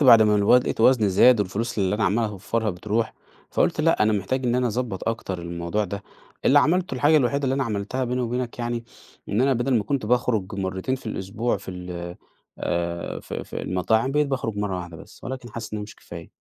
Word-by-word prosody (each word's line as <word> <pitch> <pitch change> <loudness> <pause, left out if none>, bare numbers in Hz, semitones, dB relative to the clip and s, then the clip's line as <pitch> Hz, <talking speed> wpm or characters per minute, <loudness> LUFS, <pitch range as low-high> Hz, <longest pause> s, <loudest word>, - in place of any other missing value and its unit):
بعد 115 -5 +9
ما 105 -1 +4
الوت 105 +5 +5
لاقيت 115 - -3
وزني 115 -3 +5
زاد، 105 +4 +6
والفلوس 105 +4 -2
اللي 95 0 +2
أنا 105 - 0
عَمّال 110 +5 +2
أوفرها 105 +2 -2
بتروح، 105 +5 -2 0.4
فقُلت - - +1
لأ، - - +3
أنا 110 0 +3
محتاج 105 +7 -1
إن 120 - +2
أنا 125 0 +2
أضبط 115 -4 -2
أكتر 115 -5 -3
الموضوع 85 +4 -2
ده، 100 +2 -5 0.4
اللي 145 - +6
عملتُه 170 +2 +2
الحاجة 145 +5 +4
الوحيدة 140 +1 +2
اللي 135 0 +1
أنا 135 - 0
عملتها 115 +3 -2
بيني 125 +1 -1
وبينك 125 0 -2
يعني، 120 -1 -2 0.4
إن 105 +4 +1
أنا 135 +1 +4
بدل 125 +1 +1
ما 105 - -2
كنت 130 -3 -1
باخرُج 110 -5 +1
مرتين 95 +5 -2
في 130 -3 -9
الأسبوع، 110 +3 -2
في - - -8
ال 90 -1 -6 0.4
آآ 85 0 -2
في - - -6
في - - -6
المطاعم، 110 +8 +1
بقيت 150 0 +3
باخرُج 125 -6 -2
مَرّة 105 -2 -1
واحدة 85 -2 -7
بس، - - -14
ولكن 125 -2 -6
حاسِس 110 -1 -7
إنها 105 - -3
مش 105 +1 -10
كفاية. 85 -1 -10
110 Hz, 210 wpm, -24 LUFS, 95-125 Hz, 0.4 s, بعد